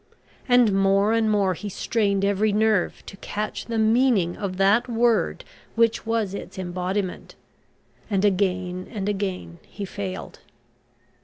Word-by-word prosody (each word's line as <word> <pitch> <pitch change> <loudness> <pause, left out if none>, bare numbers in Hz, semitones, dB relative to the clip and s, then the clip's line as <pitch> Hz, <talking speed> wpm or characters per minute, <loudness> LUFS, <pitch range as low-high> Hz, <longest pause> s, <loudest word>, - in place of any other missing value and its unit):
And 245 -4 +5
more 195 +2 +3
and 225 -1 +2
more 200 -3 +2
he 205 +4 -6
strained 200 -1 0
every 205 +2 +2
nerve 215 -2 +1
to 195 - -10
catch 210 +2 -4
the 230 -1 -2
meaning 220 -5 +3
of 190 -3 -4
that 200 +6 +3
word 235 0 +1 0.3
which 230 0 +2
was 225 -4 0
its 200 - -8
embodiment, 185 +1 -3 0.7
and 200 -1 +1
again 185 -2 0
and 200 -3 -4
again 190 -4 -3
he 205 - -8
failed. 190 -1 -6
200 Hz, 135 wpm, -24 LUFS, 190-220 Hz, 0.7 s, And